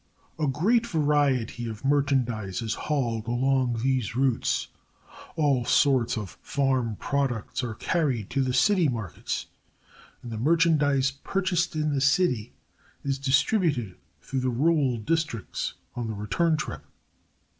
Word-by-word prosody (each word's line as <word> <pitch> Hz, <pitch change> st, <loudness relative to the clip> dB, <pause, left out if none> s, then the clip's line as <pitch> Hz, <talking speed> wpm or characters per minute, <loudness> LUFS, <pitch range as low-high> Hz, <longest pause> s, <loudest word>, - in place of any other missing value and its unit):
A 155 Hz, -, +1 dB
great 215 Hz, -, +2 dB
variety 145 Hz, -, +1 dB
of 110 Hz, +3 st, -7 dB
merchandize 125 Hz, -8 st, 0 dB
is 115 Hz, 0 st, -1 dB
hauled 120 Hz, -7 st, -2 dB
along 125 Hz, -1 st, +1 dB
these 130 Hz, -5 st, 0 dB
routes; 130 Hz, -2 st, +1 dB, 0.7 s
all 145 Hz, -6 st, +2 dB
sorts 130 Hz, -2 st, +3 dB
of 105 Hz, -4 st, -6 dB
farm 130 Hz, -6 st, 0 dB
products 135 Hz, -3 st, -1 dB
are 115 Hz, -3 st, -4 dB
carried 130 Hz, -, -1 dB
to 135 Hz, -, +1 dB
the 130 Hz, -1 st, 0 dB
city 175 Hz, +7 st, +3 dB
markets 115 Hz, -8 st, -4 dB, 0.8 s
and 120 Hz, -, -7 dB
the 110 Hz, -, -4 dB
merchandize 145 Hz, -2 st, +3 dB
purchased 175 Hz, +3 st, -1 dB
in 155 Hz, -1 st, 0 dB
the 140 Hz, -, 0 dB
city 140 Hz, -, +2 dB, 0.5 s
is 135 Hz, -1 st, -1 dB
distributed 135 Hz, -, +1 dB, 0.3 s
through 135 Hz, -, -3 dB
the 130 Hz, 0 st, 0 dB
rural 135 Hz, 0 st, +2 dB
districts 120 Hz, -, -2 dB, 0.2 s
on 120 Hz, -2 st, -3 dB
the 110 Hz, -, -4 dB
return 155 Hz, -, +1 dB
trip. 80 Hz, -, -5 dB
135 Hz, 130 wpm, -26 LUFS, 120-150 Hz, 0.8 s, sorts